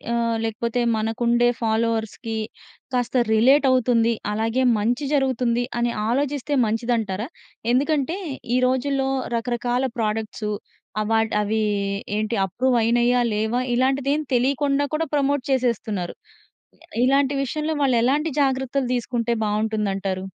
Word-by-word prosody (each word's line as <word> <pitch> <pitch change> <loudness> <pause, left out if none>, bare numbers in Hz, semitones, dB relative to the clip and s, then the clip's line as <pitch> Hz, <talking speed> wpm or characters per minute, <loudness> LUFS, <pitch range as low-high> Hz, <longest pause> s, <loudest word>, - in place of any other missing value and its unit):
ఆహ్, 230 -1 0
లేకపోతే 230 +2 -1 0.2
మనకుండే 235 +2 +2
ఫాలోవర్స్‌కి 225 0 -1 0.6
కాస్త 245 +1 -1 0.2
రిలేట్ 265 +6 +5
అవుతుంది. 235 -2 +3 0.2
అలాగే 225 +4 0 0.2
మంచి 240 +7 0
జరుగుతుంది 250 -4 +1 0.2
అని 240 0 +1 0.2
ఆలోచిస్తే 285 +3 -1
మంచిదంటారా? 225 -2 -1 0.5
ఎందుకంటే 290 +4 +1 0.4
ఈ - - +4
రోజుల్లో 270 +1 0 0.3
రకరకాల 240 +1 -1
ప్రొడక్ట్స్ 215 -1 -2 0.5
అవార్డ్ 220 +1 +1
అవి 210 +1 0 0.6
ఏంటి 215 +2 -1
అప్రూవ్ 250 +7 0
అయినాయా 240 +2 +3
లేవా? 220 +3 0
ఇలాంటిది 265 +2 +1
ఏమి 305 +1 -1
తెలియకుండా 275 +3 +2
కూడా 320 +2 0
ప్రమోట్ 285 -1 +1
చేసేస్తున్నారు. 225 -8 -1 0.9
ఇలాంటి 275 +1 +3
విషయంలో 305 +4 -2
వాళ్ళు 260 -3 +3
ఎలాంటి 290 +6 +1
జాగ్రత్తలు 265 -1 0
తీసుకుంటే 240 -1 -1
బావుంటుంది 215 0 0
అంటారు? 190 -1 -3
240 Hz, 110 wpm, -23 LUFS, 225-265 Hz, 0.9 s, రిలేట్